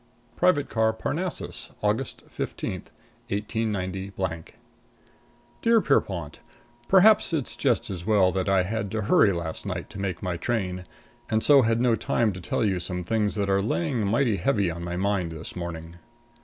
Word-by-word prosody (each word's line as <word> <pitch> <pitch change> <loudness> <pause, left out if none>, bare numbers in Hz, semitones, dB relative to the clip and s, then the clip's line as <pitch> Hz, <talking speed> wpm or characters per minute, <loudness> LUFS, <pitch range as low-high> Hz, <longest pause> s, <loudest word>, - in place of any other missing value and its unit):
| - - -36
+ 120 - -35
+ 120 -1 -35
VI - - -32
PRIVATE 145 -6 +3
CAR 110 -1 +1
PARNASSUS, 170 +10 -3
Aug. 110 +5 -1
15, - - -4 0.6
189 95 -4 -2 1.2
Dear 230 0 +5
Pierrepont: 90 - 0 0.5
Perhaps 195 -1 +5
it's 145 -6 -2
just 120 -4 0
as 90 -3 -5
well 100 -2 +4
that 95 +1 -1
I 95 -1 +4
had 105 +1 -3
to 110 -1 -1
hurry 100 0 +5
last 85 -3 -4
night - - -5
to 100 - -8
make 95 -2 -3
my 90 -2 -2
train, 90 -4 -2 0.4
and 110 0 +1
so 145 -2 +7
had 115 -1 +2
no 120 -1 +3
time 115 -1 +1
to 90 - -8
tell 100 +6 -1
you 95 -3 +1
some 90 +1 -4
things 105 +2 0
that 100 -2 0
are 100 0 +2
laying 125 - -1
mighty 115 0 +2
heavy 100 -2 +1
on 85 +1 -6
my 85 0 -3
mind 95 -3 0
this 80 0 -8
morning. 85 -1 -6
100 Hz, 175 wpm, -26 LUFS, 90-115 Hz, 1.2 s, so